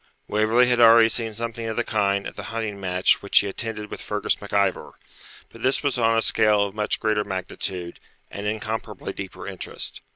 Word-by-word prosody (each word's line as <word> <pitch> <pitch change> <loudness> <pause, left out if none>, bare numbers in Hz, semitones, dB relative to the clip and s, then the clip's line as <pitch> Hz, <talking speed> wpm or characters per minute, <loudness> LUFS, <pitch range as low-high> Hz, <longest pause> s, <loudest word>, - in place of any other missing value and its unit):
Waverley 110 +4 +3
had 125 -1 +2
already 115 -1 +7
seen 115 -1 -2
something 115 +1 -4
of 110 - -3
the 120 - 0
kind 100 -3 0
at - - -7
the - - -7
hunting 110 -3 -4
match 90 -1 +2
which 100 - +1
he 100 - +6
attended 105 +1 -4
with - - -6
Fergus 105 0 -1
MacIvor; 100 -2 -1 0.6
but 115 - -14
this 130 +4 +1
was 140 -3 0
on 115 -1 +3
a 115 - +2
scale 105 -1 +3
of 100 - -6
much 105 0 -1
greater 110 -1 +1
magnitude, 95 -2 -4 0.3
and 100 +1 -5
incomparably 110 -2 -4
deeper 95 -2 -8
interest. - - -5
105 Hz, 190 wpm, -24 LUFS, 100-115 Hz, 0.6 s, already